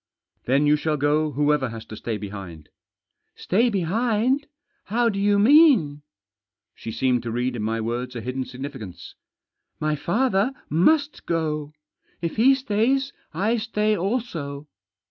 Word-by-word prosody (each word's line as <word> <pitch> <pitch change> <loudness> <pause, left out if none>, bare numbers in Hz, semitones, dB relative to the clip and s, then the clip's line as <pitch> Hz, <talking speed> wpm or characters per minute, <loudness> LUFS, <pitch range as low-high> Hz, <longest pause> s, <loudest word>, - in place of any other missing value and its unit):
" - - -48
Then 135 +4 +3
you 150 +1 +4
shall 150 0 -1
go 150 +2 +1
whoever 145 -2 +1
has 115 -1 -8
to 110 - -9
stay 110 0 -4
behind." 95 -7 -8 0.4
" - - -54
Stay 230 +7 +3
behind 225 - 0 0.2
— - - -47
how 235 +3 +1
do 195 -3 -3
you 205 0 +3
mean? 215 - +5 0.4
" - - -68 0.3
She 110 - -7
seemed 125 +1 +1
to 120 - -5
read 125 +2 -1
in 115 - -4
my 110 +1 -1
words 120 +3 -3
a 120 - -4
hidden 125 +3 -3
significance. 130 -7 -8 0.3
" - - -55
My 155 0 0
father 205 - +1 0.2
must 285 - +2
go. 155 -3 -2 0.5
If 170 +3 -4
he 265 +5 +6
stays 265 +3 0 0.2
I 220 +5 0
stay 215 -1 0
also." 170 - -3
155 Hz, 160 wpm, -24 LUFS, -, 0.5 s, he